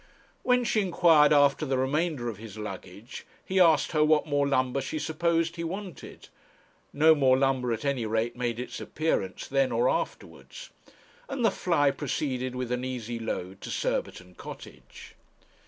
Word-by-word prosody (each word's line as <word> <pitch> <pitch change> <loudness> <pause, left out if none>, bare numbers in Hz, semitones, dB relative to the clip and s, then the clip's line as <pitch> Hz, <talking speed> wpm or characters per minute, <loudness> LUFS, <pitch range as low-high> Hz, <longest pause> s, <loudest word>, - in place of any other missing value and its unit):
When 250 0 +2
she 220 -2 +1
inquired 165 -5 +4
after 145 0 +4
the 135 -3 0
remainder 140 0 -1
of 115 -4 -4
his 110 -1 -10
luggage, 100 +2 -8 0.2
he 190 0 0
asked 165 -4 +4
her 155 -2 +3
what 155 0 +3
more 145 -2 +1
lumber 130 0 +1
she 135 - -4
supposed 165 +2 0
he 170 - -3
wanted. 185 -1 -7 0.6
No 160 +2 +5
more 135 -4 +3
lumber 130 -2 +1
at 115 +3 -3
any 135 -5 -1
rate 115 +2 -1
made 120 -1 -2
its 125 - -6
appearance, 150 -12 -2
then 135 -1 +1
or 120 +2 +2
afterwards; - - -4 0.6
and 255 -4 -1
the 220 - +4
fly 155 -7 +1
proceeded 130 -2 -3
with 125 -1 -4
an 125 0 -1
easy 120 -2 -4
load 95 -4 -5
to - - -7
Surbiton 90 0 -3
Cottage. 65 -7 -12
135 Hz, 160 wpm, -27 LUFS, 120-160 Hz, 0.6 s, No